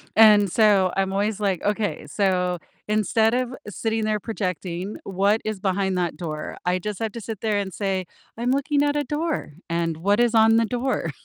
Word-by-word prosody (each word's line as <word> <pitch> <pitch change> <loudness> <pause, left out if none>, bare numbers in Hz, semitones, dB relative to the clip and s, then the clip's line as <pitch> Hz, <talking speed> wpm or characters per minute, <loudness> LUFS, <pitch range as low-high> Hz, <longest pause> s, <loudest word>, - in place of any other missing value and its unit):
and 210 -4 +7
so 205 -4 +4
I'm 190 0 +1
always, 205 +1 0
like, 195 -4 0
"Okay, 210 0 -1
so 180 -3 +1 0.3
instead 215 +2 +2
of 255 0 -1 0.2
sitting 220 +2 -2
there 215 -1 0
projecting 185 -3 -4
what 200 +3 +1
is 215 -3 -3
behind 190 -1 0
that 175 -4 -1
door, 155 -3 -5
I 180 +1 +1
just 210 +3 -5
have 220 -2 -2
to 235 - -6
sit 220 -1 -6
there 215 -2 +1
and 195 -1 -3
say, 190 -2 -2 0.3
‘I'm 240 +2 -1
looking 280 +1 +1
at 290 0 +1
a 295 - +1
door, 300 - -3 0.2
and 170 -1 -1
what 200 +6 +1
is 240 -1 +3
on 225 0 +6
the 230 - +3
door?'" 245 - -1
205 Hz, 190 wpm, -24 LUFS, 185-225 Hz, 0.3 s, and